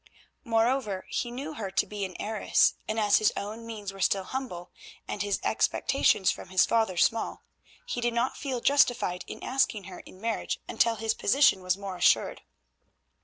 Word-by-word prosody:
Moreover 225 -3 0
he 240 - -1
knew 275 +6 -6
her 215 -9 -5
to 190 - +1
be 210 -1 -5
an 185 - -9
heiress, 215 0 +2 0.2
and 220 +1 -1
as 210 -1 +4
his 215 - +3
own 220 +3 -6
means 210 -3 -6
were 195 - -9
still 195 +1 +2
humble, 185 -7 -6 0.4
and 200 - -4
his 205 -1 0
expectations 205 -8 +2
from - - -9
his 185 -1 +4
father 220 -6 +1
small, 225 +5 +1 0.4
he 245 - -3
did 240 0 0
not 240 +2 0
feel 260 -4 -4
justified 245 -10 +2
in - - -8
asking 255 -5 0
her 185 -1 -10
in 185 - -14
marriage 225 +1 -2
until 230 0 +2
his 220 0 -1
position 225 -3 +3
was 180 0 0
more 195 -2 -6
assured. 175 0 +2
215 Hz, 175 wpm, -28 LUFS, 195-240 Hz, 0.4 s, as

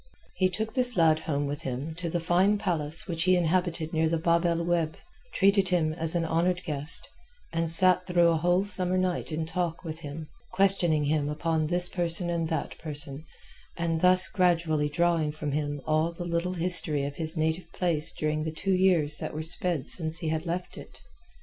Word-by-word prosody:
He 185 -1 +1
took 220 +4 -2
this 250 -3 +3
lad 160 -2 +4
home 145 -2 -2
with 145 +2 -4
him 135 +4 -5
to 170 -1 -4
the 175 - -1
fine 180 +5 +2
palace 160 -6 -1
which 165 -1 -2
he 185 0 +4
inhabited 170 -2 0
near 160 0 +1
the 165 - 0
Bab 170 +1 +1
el 170 -1 +1
Oueb, 170 -2 -1 0.4
treated 195 -1 +2
him 165 -4 +1
as 165 0 +3
an 170 -1 0
honoured 175 +3 0
guest, 150 +1 0 0.5
and 165 0 -1
sat 180 +2 +3
through 175 -2 +3
a 165 - +2
whole 175 +3 +2
summer 185 -2 0
night 185 -2 -1
in 160 +1 -2
talk 165 +1 -3
with 160 -2 -6
him, 155 0 -8 0.3
questioning 185 -5 +4
him 145 0 0
upon 155 +1 -1
this 175 +2 +3
person 175 -1 0
and 165 -1 -2
that 160 -3 -4
person, 150 -1 -5 0.5
and 165 -1 -1
thus 185 0 +6
gradually 170 -5 +1
drawing 165 0 +1
from 150 -1 -5
him 145 0 -2
all 155 +2 +1
the 175 +1 -7
little 170 +1 -2
history 170 -4 +1
of 145 0 -6
his 160 0 -3
native 160 +2 -2
place 165 -3 0
during 155 0 -2
the 160 - -3
two 190 +5 -2
years 175 -6 +2
that - - -5
were 155 - -3
sped 165 -2 -2
since 160 -2 -2
he 165 -2 -3
had 160 +2 -3
left 175 +2 -4
it. - - -14
165 Hz, 195 wpm, -27 LUFS, 155-180 Hz, 0.5 s, thus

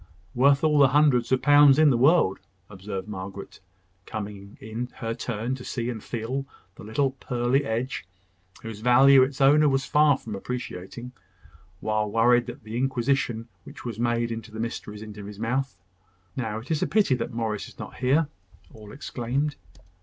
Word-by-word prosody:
"Worth 140 +3 +4
all 150 -2 +3
the 140 - +7
hundreds 135 -3 +3
of 130 - +2
pounds 145 -1 +7
in 155 -2 +6
the - - +2
world," 135 - +3 0.3
observed 95 0 -6
Margaret, 100 -1 -8 0.5
coming 100 -2 -7
in 110 +3 -5
her 115 -1 -3
turn 115 0 -3
to 130 -1 -6
see 120 -1 -3
and 110 -3 -7
feel 130 +4 -4 0.3
the - - -13
little 130 +6 0
pearly 130 +1 -1
edge, 120 +5 -2 0.6
whose 115 -2 -7
value 130 +4 +6
its 130 +2 0
owner 145 +2 +5
was 135 0 0
far 150 -1 +4
from 110 - -8
appreciating, 120 +1 -6 0.7
while 110 -1 0
worried 120 +2 +3
with 120 -1 -8
the 110 +2 -6
inquisition 125 -2 0 0.2
which - - -12
was 115 -2 -5
made 120 0 0
into 115 0 -6
the 110 +1 -9
mysteries 110 -2 -5
of 110 -1 -9
his 105 0 -9
mouth. 125 +3 -2 0.6
"Now 110 -4 -3
it 115 +8 -8
is 155 - 0
a - - +1
pity 210 -11 +3
that - - -4
Morris 110 -3 -3
is - - -16
not - - -9
here!" 140 +5 +2 0.5
all 105 -1 -12
exclaimed. 135 +2 -3
120 Hz, 170 wpm, -25 LUFS, 110-135 Hz, 0.7 s, the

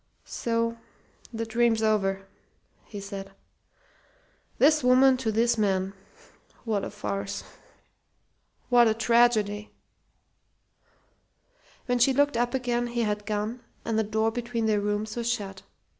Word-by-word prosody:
"So! 230 0 -2 0.5
The 230 -1 -3
dream's 225 0 +1
over!" 195 -3 +1 0.6
he 205 - -8
said. 195 -1 -7 1.2
"'This 305 +1 +4
woman 255 +1 +6
to 240 -4 -1
this 230 +1 +2
man'! 190 -2 0 0.7
What 215 -3 -1
a - - -3
farce 200 -1 -4 1.3
what 240 -1 +6
a 220 - +2
tragedy!" 220 -3 +2 2.2
When 245 -1 0
she 265 +3 +4
looked 285 0 +2
up 240 +2 0
again 240 -2 -1
he 235 0 -1
had 210 -1 -2
gone 215 +3 -2 0.3
and 220 -1 0
the - - +2
door 220 +1 0
between 235 -1 -3
their 210 -2 +2
rooms 210 +1 -2
was 235 0 -1
shut. 195 -4 -4
225 Hz, 125 wpm, -27 LUFS, 210-240 Hz, 2.2 s, woman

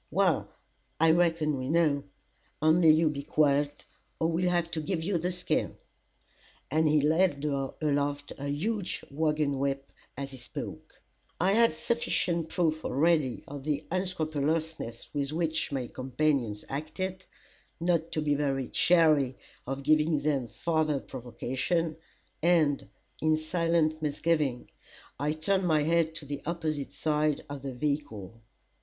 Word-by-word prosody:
"Well, - - +2 0.5
I 165 0 +6
reckon 165 -4 +2
we 130 +1 -3
know. 155 -3 +2 0.5
Only 160 +2 +5
you 155 +1 +5
be 145 -2 -1
quiet, 145 0 +1 0.3
or 160 - +2
we'll 180 +2 +1
have 175 -1 0
to 160 - -2
give 160 +1 -2
you 180 0 0
the 180 +3 -1
skin." 180 0 -1 0.9
And 160 +1 +3
he 150 -1 +3
held 160 -3 +2 0.4
aloft 145 -1 0
a 140 - -4
huge 185 +8 -2
wagon 150 -2 0
whip 135 0 -2 0.3
as 140 0 -4
he 135 - -9
spoke. 120 - -8 0.4
I 185 +3 +3
had 230 +3 +5
sufficient 170 -2 0
proof 160 -3 0
already 150 -3 +1
of 140 -1 -7
the 150 0 -1
unscrupulousness 160 -7 -2
with 140 -1 -1
which 160 -1 0
my 135 -3 -2
companions 130 -4 -1
acted, 185 +6 -4 0.5
not 170 -1 +1
to 155 - 0
be 145 -1 +2
very 135 -3 -1
chary 155 -7 +4 0.3
of 135 +1 -3
giving 155 +1 +3
them 140 -4 0
farther 155 - 0
provocation, 130 +7 -2 0.5
and, 155 -4 +3 0.3
in 155 0 +3
silent 160 -1 +1
misgiving, 150 -3 0 0.5
I 150 +2 0
turned 185 +4 +1
my 155 -3 +3
head 165 0 +2
to 155 - -7
the 140 0 -5
opposite 155 -4 -2
side 150 -1 0
of 145 -1 -6
the 135 -2 -5
vehicle. 125 -7 -3
155 Hz, 135 wpm, -29 LUFS, 140-165 Hz, 0.9 s, I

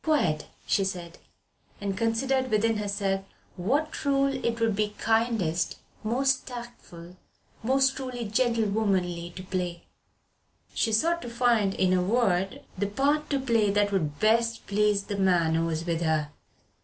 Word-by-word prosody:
"Quite," 175 - +1 0.2
she 195 - +2
said, 175 -3 -5 0.6
and 200 -1 -2
considered 260 +5 0
within 220 0 +2
herself 200 -2 -1 0.3
what 280 - 0
rôle 275 -2 0
it 235 0 -1
would 225 -2 +2
be 210 0 -1
kindest, 220 -8 +1 0.3
most 265 +4 +1
tactful, 235 -8 -10 0.4
most 265 +3 +2
truly 255 -3 -4
gentlewomanly 205 -6 0
to 185 - -7
play. 180 -2 -3 0.9
She 225 - +1
sought 335 +10 +2
to 240 - -6
find, 235 -5 +2
in 185 -1 +2
a 180 - +3
word, 195 -2 +1
the 200 +2 -1
part 285 +8 +1
to 280 - +1
play 230 -5 +2
that 205 0 +2
would 155 -7 -1
best 230 +1 +2
please 205 0 +2
the 200 0 -4
man 175 -4 +3
who 165 +1 +1
was 165 0 -2
with 170 -1 -1
her. 155 -2 0
210 Hz, 145 wpm, -27 LUFS, 185-240 Hz, 0.9 s, a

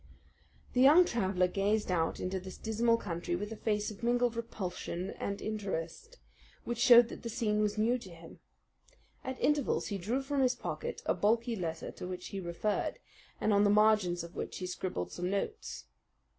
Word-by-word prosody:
The 250 - +3
young 305 +7 +8
traveller 190 - +1
gazed 200 +2 0
out 165 -2 0
into 185 +1 -2
this 185 0 -9
dismal 230 +1 +2
country 175 -4 -3
with 205 +4 -4
a - - -4
face 210 -1 -1
of 210 - -12
mingled 240 0 +2
repulsion 190 -4 -4
and 200 0 -4
interest, 210 - -4 0.5
which 240 0 -4
showed 240 -1 +8
that - - -8
the 235 - -5
scene 215 -2 0
was 210 0 0
new 235 +4 +2
to 195 - -11
him. 165 -1 -13 0.8
At 260 0 -5
intervals 295 -3 +1
he 200 -2 -3
drew 235 +9 -1
from 280 0 0
his 255 -1 +3
pocket 475 0 -5
a - - +2
bulky 230 +3 +1
letter 165 -4 -4
to - - -7
which 180 -1 -6
he 195 - -5
referred, 180 +4 -2 0.4
and 215 - +2
on 200 0 +5
the 205 - +4
margins 210 -5 +4
of 170 +1 -10
which - - -4
he 185 - -4
scribbled 180 - -4
some 180 +1 -3
notes. 310 - -3
210 Hz, 185 wpm, -32 LUFS, 185-235 Hz, 0.8 s, young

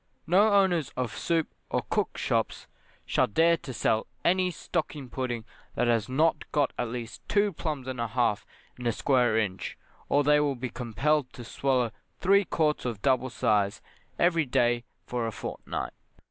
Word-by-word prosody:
No 200 +6 +4
owners 180 -6 +3
of 125 -3 -2
soup 165 -2 0 0.2
or - - 0
cook - - 0
shops - - -1 0.4
shall 130 - +2
dare 165 +9 +4
to 135 - -8
sell 110 -2 +1 0.2
any 185 +1 +3
stocking 155 -7 -4
pudding 120 -3 -3 0.3
that 125 - +2
has 115 -2 +1
not 155 +5 +1
got 145 -3 +1
at 120 - -2
least 115 -1 -6
two 205 -1 +2
plums 150 -5 -4
and 130 -2 -3
a 115 - 0
half 115 -2 +1 0.4
in 125 - -3
a 120 - +2
square 125 -2 +2
inch, 100 -4 -2 0.3
or 145 +1 +4
they 150 +1 +5
will 145 -2 +1
be 125 0 -4
compelled 130 +4 0
to 120 - -9
swallow 125 0 0 0.3
three 200 +2 +4
quarts 155 -3 +1
of 115 -5 -4
double 130 -1 +2
size 100 -4 +1 0.4
every 165 -4 +3
day 120 -1 +2 0.2
for 120 0 -2
a - - -2
fortnight. - - -5
130 Hz, 170 wpm, -28 LUFS, 120-160 Hz, 0.4 s, they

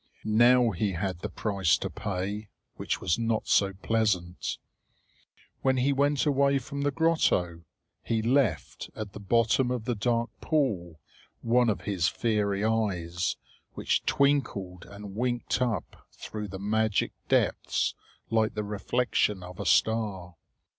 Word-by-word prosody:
Now 120 +2 +5
he 100 +1 -1
had 90 0 -3
the - - -5
price 100 -5 +1
to - - -3
pay, 100 +1 -4 0.2
which - - -3
was 80 - +1
not 115 -1 -1
so 100 -1 +3
pleasant. 100 -6 0 1.0
When 130 -1 +2
he 135 +3 +2
went 145 +1 +2
away 140 -1 +3
from 140 +2 -5
the 145 - +2
grotto, 135 - +1 0.4
he 110 -1 -1
left 130 -1 0
at 105 -2 -6
the - - -8
bottom 115 +5 +2
of 125 -3 -2
the 125 - 0
dark 115 +2 0
pool 100 - -1 0.4
one 120 +1 +3
of 105 - -1
his 95 -5 0
fiery 105 -2 0
eyes, 90 -6 0 0.4
which - - 0
twinkled 110 -11 0
and 100 -1 -9
winked 120 +2 -1
up 115 -8 -3
through 105 -1 -6
the 95 0 -7
magic 105 +1 0 0.2
depths - - +1 0.4
like 110 -1 +2
the 105 - -2
reflection 105 -1 0
of 90 0 -10
a - - -3
star. 105 -6 +1
110 Hz, 140 wpm, -28 LUFS, 95-125 Hz, 1.0 s, Now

